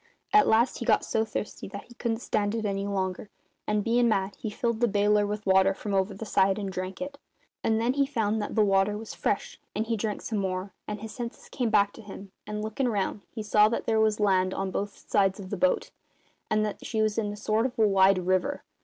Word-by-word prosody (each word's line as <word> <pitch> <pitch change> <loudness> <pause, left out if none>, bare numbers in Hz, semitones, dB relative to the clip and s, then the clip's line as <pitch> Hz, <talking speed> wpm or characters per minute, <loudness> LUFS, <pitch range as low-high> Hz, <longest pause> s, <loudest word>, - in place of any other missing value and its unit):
At 420 - +6
last 230 +3 +3
he 235 - -4
got - - +3
so 220 - +1
thirsty 215 -1 -5
that 200 +1 -8
he 240 - -16
couldn't 235 -1 -2
stand 205 0 0
it 225 -1 -2
any 200 0 -1
longer, 190 0 -2 0.4
and, 210 -1 +1
bein' 235 +2 +3
mad, 195 -2 0
he 220 - -5
filled 235 +1 -1
the 240 - +3
baler 205 0 +3
with 210 +1 -4
water 190 0 +4
from 205 0 -4
over 190 +1 +1
the 225 - -6
side, 195 -2 +3
and 200 -2 -3
drank 185 +3 -5
it. 280 0 -8 0.4
And 220 0 +2
then 235 +3 +1
he 280 0 +2
found 220 -5 0
that 205 - -4
the 215 -2 +4
water 195 +1 +2
was 220 0 -7
fresh, 200 - -2 0.2
and 215 +2 0
he 230 0 0
drank 215 -1 -3
some 220 -3 -2
more, 185 0 -3
and 210 -1 -5
his 220 0 -7
senses 240 -1 -7
came 245 -4 -1
back 205 -1 +3
to - - -11
him, 200 -2 -10 0.2
and, 210 0 -4
lookin' 220 +4 -1
round, 205 -1 -1
he 220 - -6
saw 210 0 +5
that 230 - -2
there 220 -1 +2
was 215 -1 +2
land 190 -2 +2
on 195 0 -2
both 200 +2 -5
sides 195 -1 +2
of 190 -2 -8
the - - 0
boat 275 - +1 0.6
and 215 0 +2
that 210 - -5
she 220 - -2
was 215 0 +1
in 210 -2 -1
a 205 - -7
sort 215 +3 +1
of 255 0 -11
wide 195 -4 +4
river. 185 +10 0
210 Hz, 240 wpm, -27 LUFS, 195-225 Hz, 0.6 s, At